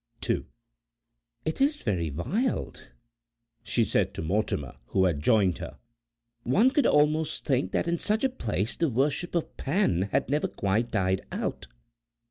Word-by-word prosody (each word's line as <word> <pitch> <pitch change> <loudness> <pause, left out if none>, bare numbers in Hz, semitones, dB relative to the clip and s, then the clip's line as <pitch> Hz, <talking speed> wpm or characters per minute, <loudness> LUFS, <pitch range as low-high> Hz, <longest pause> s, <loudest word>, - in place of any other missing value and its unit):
"It 160 +10 -2
is 295 +2 +2
very 90 -7 0
wild," 200 - -2 0.7
she - - +1
said - - 0
to - - -4
Mortimer, 85 - -1
who 95 -1 +2
had 80 -6 0
joined 100 -1 +3
her; - - -7 0.6
"one 205 - +3
could 285 +1 +3
almost 150 +1 +2
think 125 -10 +1
that - - 0
in 170 0 0
such 215 +3 0
a 265 - +3
place 105 - -2
the 165 - +1
worship 140 +8 0
of 170 - -2
Pan 135 - +1
had 135 +1 +1
never 150 +3 +1
quite 105 +4 -1
died 95 -2 0
out." - - -3
125 Hz, 145 wpm, -27 LUFS, -, 0.7 s, joined